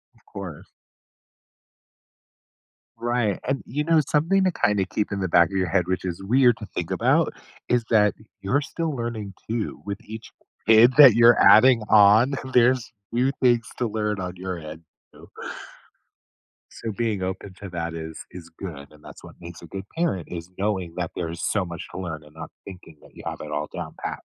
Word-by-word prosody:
Of - - -29
course. 90 -6 -9 2.3
Right 120 -4 -1
and, 135 0 -1
you 145 +4 -2
know, 165 0 +3
something 175 +6 +2
to 185 - +2
kinda 105 - +1
keep 105 +2 -3
in 100 - -2
the 95 - 0
back 85 0 +4
of 95 - -7
your 90 -1 0
head- 90 -1 +1
which 95 0 -2
is 90 +1 -4
weird 120 +2 +4
to 105 - -8
think 85 - -5
about, - - +2 0.4
is 125 -1 +2
that 105 -3 +4 0.3
you're 130 +9 +1
still 155 +1 -3
learning 115 -5 -5 0.2
too 115 -2 -3
with 100 0 -4
each 110 +1 -10 0.4
kid 115 +3 +7
that 135 -7 +9
you're 120 0 +6
adding 120 +1 +7
on, 110 +5 +6 0.2
there's 125 0 +3 0.2
new 125 +3 +1
things 120 -2 +3
to 120 - 0
learn 105 -2 -2
on 90 -1 -5
your 90 0 -5
end, 80 +1 -10 0.3
too. - - -16 1.4
So 115 - -6
being 110 -3 -2
open 95 +1 -5
to 100 - -7
that 85 -1 -4
is 80 -1 -7
is 85 -2 -11
good, 75 -7 -8
and 75 0 -19
that's - - -12
what - - -13
makes 85 0 -10
a - - -10
good 95 +3 -7
parent 95 - -1
is 85 0 -7
knowing 95 -4 -2
that 90 -3 -3
there's 85 -1 -4
so 100 -4 0
much 85 0 -7
to - - -6
learn 80 -4 -6
and 75 0 -18
not 80 -1 -9
thinking 90 -4 -12
that - - -18
you - - -12
have - - -5
it 75 - -7
all 75 +1 -2
down - - -6
pat. - - -4
100 Hz, 190 wpm, -24 LUFS, 85-120 Hz, 2.3 s, that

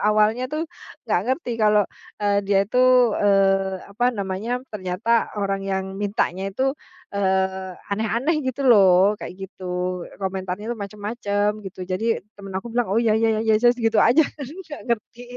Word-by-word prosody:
awalnya 215 +4 +2
tuh 305 +3 -2 0.4
enggak 215 -7 +1
ngerti 260 -1 -1
kalau, 210 -1 +4 0.4
eee, 205 -1 +2
dia 200 -1 +4
itu, 245 +5 +1 0.4
eee, 195 -2 +2
apa 240 +4 -1
namanya, 200 -1 -3 0.2
ternyata 210 +4 0
orang 195 -1 -1
yang 190 -1 -2 0.2
mintanya 195 -2 -1
itu, 260 +7 0 0.4
eee, 190 -1 0 0.2
aneh-aneh 230 +9 0
gitu 260 -1 -3
loh, 200 -3 +5
kayak 180 - -7
gitu. 190 0 -10 0.5
Komentarnya 190 0 -4
itu - - -7
macam-macam 205 0 -2
gitu, 190 -2 -9
jadi 225 +2 0
teman 195 -2 -8
aku 225 +4 -6
bilang, 240 -2 0
"Oh, 195 - 0
iya 230 -2 +3
iya 225 - +3
iya, - - -1
yes 215 - +3
yes." 240 - +3
Gitu 225 -2 +2
aja 290 +7 +5
tapi 280 -2 -8
enggak 295 -3 -9
ngerti, 235 +1 -3
205 Hz, 160 wpm, -23 LUFS, 195-235 Hz, 0.5 s, loh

